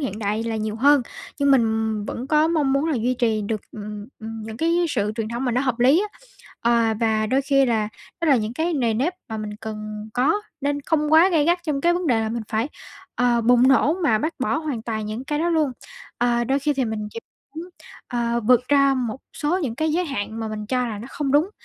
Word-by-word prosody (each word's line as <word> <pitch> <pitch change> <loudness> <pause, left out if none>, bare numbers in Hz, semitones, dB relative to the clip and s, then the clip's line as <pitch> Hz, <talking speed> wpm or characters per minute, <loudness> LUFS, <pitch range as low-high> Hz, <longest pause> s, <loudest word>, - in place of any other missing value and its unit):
hiện 220 -7 -3
đại 210 +1 -1
là 225 -1 -2
nhiều 215 0 -3
hơn, 280 +3 +5 0.4
nhưng 280 -1 +3
mình 220 -4 +2
vẫn 245 - -5
có 305 +2 +3
mong 300 -5 +1
muốn 275 +2 +2
là 310 - 0
duy 245 +2 0
trì 225 -4 0
được, 215 +1 -2
ừm, 210 0 -7
ừm, 220 0 -7
những 220 0 -7
cái 335 +3 +2
sự 210 -6 -1
truyền 225 -2 -2
thống 235 +3 -3
mà 250 - 0
nó 245 - +1
hợp 255 -3 -1
lý 275 +9 +5
á. - - -22 0.4
Ờ, 230 -1 +2
và 220 -1 +1
đôi 265 +5 +1
khi 275 -1 +3
là, 220 -3 +1 0.3
đó 335 - +1
là 275 - +6
những 215 0 -2
cái 325 +6 -1
nề 235 -5 +1
nếp 285 +11 0
mà 220 - -4
mình 210 -1 -5
cần 215 -1 -6
có 260 +6 +3 0.3
nên 285 0 -1
không 300 +1 0
quá 330 +4 +7
gay 325 -5 +2
gắt 345 +3 +3
trong 295 -4 -2
cái 345 +2 +3
vấn 355 -1 -2
đề 235 -5 +3
là 220 - -1
mình 230 0 -3
phải, 225 +6 -1 0.5
ờ, 245 -1 +2
bùng 245 +2 +5
nổ 275 +3 +4
mà 220 -9 +3
bác 315 +7 -2
bỏ 260 - +1
hoàn 295 -8 -4
toàn 220 -2 -3
những 220 +5 -5
cái 295 +1 -2
đó 335 +2 +1
luôn. 310 -5 +1 0.5
Ờ, 240 0 +2
đôi 265 +3 +1
khi 295 +2 0
thì 265 - 0
mình 215 -2 -3
chỉ 230 - -7 0.3
muốn, 335 +3 -7 0.4
ờ, 235 -1 -1
vượt 245 +2 +3
ra 275 -1 +4
một 250 -1 -3 0.2
số 315 +4 0
những 235 -5 -2
cái 315 +2 0
giới 355 +2 +1
hạn 225 -6 -4
mà 220 - -3
mình 210 -1 -5
cho 250 +1 0
là 215 -3 -5
nó 230 - -8
không 280 -3 -2
đúng, 305 +7 +3
245 Hz, 245 wpm, -23 LUFS, 220-290 Hz, 0.5 s, quá